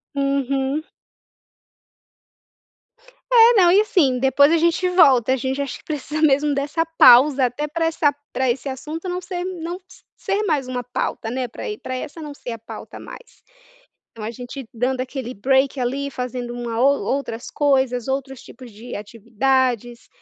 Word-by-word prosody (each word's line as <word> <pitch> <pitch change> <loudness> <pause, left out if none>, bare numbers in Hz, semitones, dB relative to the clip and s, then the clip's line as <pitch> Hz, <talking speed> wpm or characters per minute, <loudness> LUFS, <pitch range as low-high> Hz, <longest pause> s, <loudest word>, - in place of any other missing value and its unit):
Uhum. 275 +1 -1 2.5
É, 465 0 +8
não 350 -1 +6
e 385 - +6
assim, 315 -12 +2
depois 280 +3 +4
a 335 - +4
gente 340 +2 +1
volta 265 -9 +5
a - - +2
gente 265 +2 -2
acho 280 -3 -5
que - - -23
precisa 305 0 -4
mesmo 295 -1 +3
dessa 290 +4 -1
pausa, 260 +2 +7
até 250 +5 -2
pra 325 +2 -2
essa 320 -3 +1 0.2
pra 260 -1 +1
esse 255 +3 -5
assunto 305 +6 -6
não 360 0 -3
ser 365 0 -8
m 370 -2 -6
não 340 +2 -4
s - - -18
ser 400 +2 -1
mais 300 -9 0
uma 250 -1 -4
pauta, 230 -2 -4
né, 255 0 -2
pra 230 - -10
aí 420 - -4
pra 255 - -6
essa 285 +5 -7
não 300 -2 -7
ser 250 - -8
a 230 - -6
pauta 220 - -10
mais. - - -13 0.7
Então 225 - -11
a 220 - -3
gente 245 +2 -8
dando 250 +2 -1
aquele 255 -1 -5
break 265 +5 +1
ali, 275 +3 -2
fazendo 250 -2 -5
uma 240 -2 -4
ou 275 +3 +3
outras 255 -3 -3
coisas, 265 -4 +1
outros 270 -1 -4
tipos 250 -1 -13
de 225 +4 -10
atividades, 235 +2 -1
270 Hz, 170 wpm, -21 LUFS, 245-300 Hz, 2.5 s, É